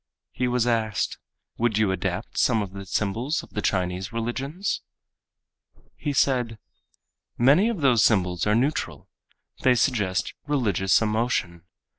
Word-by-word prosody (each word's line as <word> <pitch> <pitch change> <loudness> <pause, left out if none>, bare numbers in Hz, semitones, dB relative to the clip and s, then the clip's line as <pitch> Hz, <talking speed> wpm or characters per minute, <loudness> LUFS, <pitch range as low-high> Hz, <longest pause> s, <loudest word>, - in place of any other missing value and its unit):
He 125 - -1
was 125 -1 +1
asked, 110 -4 0 0.4
"Would 115 -2 +1
you 110 -3 +2
adapt 95 - -3
some 110 -2 +3
of 95 -1 -8
the 100 -1 -8
symbols 115 - -1
of - - -15
the 105 - -3
Chinese 90 +2 -1
religions?" 135 - -3 1.1
He 145 - -3
said, 125 -4 +1 0.8
"Many 145 - +5
of 215 -9 -3
those 125 -7 +4
symbols 90 -4 +2
are 105 - +3
neutral. 135 +6 -1 0.5
They 125 -1 +4
suggest 105 -6 0
religious 110 -8 +2
emotion. 105 -6 -1
115 Hz, 130 wpm, -25 LUFS, 100-130 Hz, 1.1 s, Many